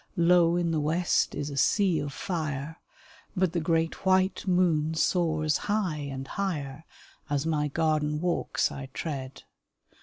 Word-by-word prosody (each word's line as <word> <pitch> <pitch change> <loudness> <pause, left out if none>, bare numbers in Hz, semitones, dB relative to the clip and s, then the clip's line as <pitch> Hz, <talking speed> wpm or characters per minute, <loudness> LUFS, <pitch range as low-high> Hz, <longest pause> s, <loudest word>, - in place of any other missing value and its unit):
Low 170 0 +4
in 175 -1 0
the 160 - +1
west 165 +4 +1
is 145 0 -3
a 140 - -6
sea 185 +3 +3
of 145 - -4
fire, 155 -2 -4 0.6
But 185 -2 +1
the 175 - +1
great 165 0 0
white 190 +1 +2
moon 165 -4 +2
soars 155 -2 +1
high 195 -7 0
and 135 0 -6
higher, 160 -6 -4 0.4
As 145 0 0
my 150 -2 0
garden 150 0 0
walks 175 +1 0
I 135 -1 -7
tread. 135 -5 -5
160 Hz, 145 wpm, -28 LUFS, 150-175 Hz, 0.6 s, Low